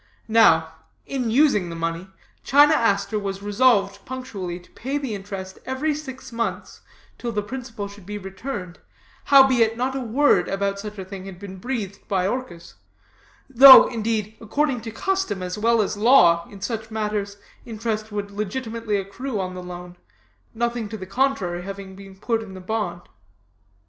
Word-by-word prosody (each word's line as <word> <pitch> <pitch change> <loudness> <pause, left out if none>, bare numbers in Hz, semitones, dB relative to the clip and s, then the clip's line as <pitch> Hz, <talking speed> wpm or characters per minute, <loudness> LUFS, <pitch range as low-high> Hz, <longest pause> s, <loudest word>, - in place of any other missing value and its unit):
"Now, 225 0 +4 0.3
in 255 -4 -2
using 225 - +3
the 170 - -6
money, 165 +2 -3 0.4
China 290 +3 +6
Aster 205 -5 +1
was 195 -1 -5
resolved 205 -2 +2
punctually 200 -9 -6
to 175 - -22
pay 270 +4 -3
the 270 -6 -4
interest 195 -1 -7
every 265 +4 -1
six 265 -4 -8
months 230 0 -4 0.4
till 240 - -3
the 210 -2 -2
principal 230 -2 -6
should 200 -2 -14
be 210 0 -5
returned, 195 -2 -7 0.5
howbeit 260 -5 +5
not 260 +2 -1
a - - -1
word 255 +5 +3
about 200 0 -1
such 210 0 -7
a 190 - -6
thing 190 0 -8
had 190 -2 -9
been 190 0 -9
breathed 205 -3 -4
by 185 -2 0
Orchis; 205 -8 -5 0.7
though, 270 +1 +10
indeed, 220 -2 -2
according 255 +2 0
to 225 0 -7
custom, 305 - -2
as 180 0 -4
well 230 0 +3
as 205 - -3
law, 205 -7 +5
in 200 -2 -12
such 220 +2 -4
matters, 210 -2 -3 0.3
interest 220 -1 -4
would 205 -1 -4
legitimately 220 +1 -3
accrue 210 +4 -4
on 185 -1 -3
the 180 - -7
loan, 180 0 -9 0.6
nothing 235 -1 -2
to 220 - -6
the 185 - -7
contrary 195 -5 0
having 195 0 -8
been 195 0 -12
put 225 +3 -1
in 195 -4 -10
the - - -8
bond. 215 +3 -3
210 Hz, 165 wpm, -23 LUFS, 195-245 Hz, 0.7 s, though